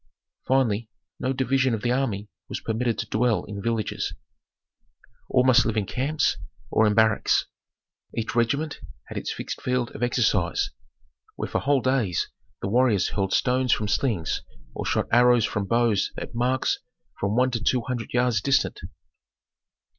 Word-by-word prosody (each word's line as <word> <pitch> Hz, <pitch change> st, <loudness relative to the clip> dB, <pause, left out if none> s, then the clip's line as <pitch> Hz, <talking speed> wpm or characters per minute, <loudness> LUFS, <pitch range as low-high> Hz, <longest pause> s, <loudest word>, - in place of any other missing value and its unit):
Finally, 120 Hz, -4 st, +1 dB, 0.3 s
no 130 Hz, -, 0 dB
division 130 Hz, -1 st, +1 dB
of 105 Hz, -, -7 dB
the 120 Hz, -, +1 dB
army 115 Hz, -6 st, -1 dB, 0.2 s
was -, -, -3 dB
permitted 115 Hz, +1 st, -1 dB
to -, -, -2 dB
dwell 115 Hz, 0 st, +1 dB
in 100 Hz, -1 st, -6 dB
villages, 115 Hz, -1 st, -2 dB, 1.1 s
all 125 Hz, -, +4 dB
must 125 Hz, -2 st, +6 dB
live 115 Hz, -1 st, -1 dB
in 105 Hz, -, +1 dB
camps 140 Hz, +9 st, 0 dB, 0.3 s
or 110 Hz, -, +4 dB
in 105 Hz, -, +2 dB
barracks. 110 Hz, -1 st, +3 dB, 0.7 s
Each 115 Hz, -1 st, -2 dB
regiment 140 Hz, +6 st, 0 dB, 0.3 s
had -, -, -6 dB
its -, -, -4 dB
fixed -, -, -5 dB
field 125 Hz, -1 st, -1 dB
of -, -, -9 dB
exercise, 110 Hz, -8 st, +1 dB, 0.6 s
where -, -, -3 dB
for -, -, -1 dB
whole 140 Hz, -1 st, +2 dB
days 125 Hz, -10 st, 0 dB, 0.3 s
the -, -, 0 dB
warriors 115 Hz, -2 st, +3 dB
hurled 95 Hz, -2 st, -1 dB
stones 125 Hz, 0 st, +2 dB
from 105 Hz, -, -1 dB
slings 100 Hz, -, 0 dB, 0.3 s
or -, -, -4 dB
shot -, -, +1 dB
arrows 120 Hz, -1 st, +5 dB
from 105 Hz, -1 st, -2 dB
bows 115 Hz, -3 st, +2 dB
at -, -, -6 dB
marks 125 Hz, +2 st, +1 dB, 0.4 s
from 100 Hz, +2 st, 0 dB
one 130 Hz, +1 st, +3 dB
to 115 Hz, -2 st, -2 dB
two 125 Hz, 0 st, +2 dB
hundred 120 Hz, -1 st, -4 dB
yards 125 Hz, -4 st, +2 dB
distant. 135 Hz, +2 st, +1 dB
120 Hz, 155 wpm, -25 LUFS, 110-130 Hz, 1.1 s, must